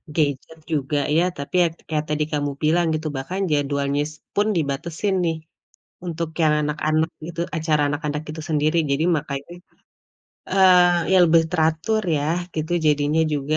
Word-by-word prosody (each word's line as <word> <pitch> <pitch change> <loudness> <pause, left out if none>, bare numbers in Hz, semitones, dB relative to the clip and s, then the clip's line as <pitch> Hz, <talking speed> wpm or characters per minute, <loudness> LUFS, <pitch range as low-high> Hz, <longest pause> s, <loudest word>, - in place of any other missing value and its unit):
gadget 150 +1 -1
juga 145 -1 0 0.2
ya, 170 - +4
tapi 140 0 -7
ya - - +3 0.2
kayak 155 -1 -1
tadi 150 0 0
kamu 145 -1 0
bilang 170 +3 +3
gitu, 155 0 -2
bahkan 180 +9 -4
jadwalnya 140 -1 0 0.3
pun 205 +1 +2
dibatesin 160 +6 -2
nih, 165 -1 0 0.7
untuk 165 -1 -3
yang 155 -1 +4
anak-anak 155 +1 0 0.2
gitu 170 -1 -7 0.2
acara 155 -2 +1
anak-anak 150 0 -3
itu 155 +1 -6
sendiri. 155 +1 +1
Jadi, 140 +3 +1
makanya, 140 +1 -6 1.0
eee, 180 -2 +5
ya, - - +6
lebih 165 -1 +5
teratur, 160 +6 +1
ya, 145 - -1 0.3
gitu, 160 +2 -3
jadinya 150 +1 +2
juga, 145 +2 -1
155 Hz, 145 wpm, -22 LUFS, 145-165 Hz, 1.0 s, ya